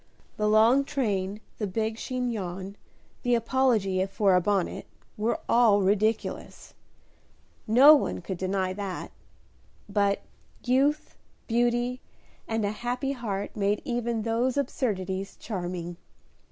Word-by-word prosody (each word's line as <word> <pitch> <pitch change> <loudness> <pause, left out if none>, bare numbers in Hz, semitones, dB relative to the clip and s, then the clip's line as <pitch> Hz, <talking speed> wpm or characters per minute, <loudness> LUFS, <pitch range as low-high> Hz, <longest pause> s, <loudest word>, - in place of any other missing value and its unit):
The 210 - 0
long 225 +6 +5
train, 210 -8 -2 0.2
the 210 - -1
big 220 +3 -2
chignon, 200 -7 -4 0.5
the 245 -1 +2
apology 230 -6 +1
for 195 0 +2
a 180 - +4
bonnet, 195 0 -1 0.3
were 220 +3 -1
all 220 -4 +4
ridiculous, 210 +3 -1 0.9
no 260 +7 +8
one 295 - +1
could 180 0 -5
deny 185 0 -1
that, 195 -1 -5 0.8
but 200 -1 +1 0.4
youth, 275 +4 +1 0.3
beauty, 240 +1 0 0.5
and 225 -1 -1
a 205 - 0
happy 245 +5 -3
heart 210 -7 -4
made 205 0 +1
even 235 -2 -1
those 235 +4 0
absurdities 195 -8 -2
charming. 175 -4 -5
215 Hz, 115 wpm, -27 LUFS, 195-240 Hz, 0.9 s, no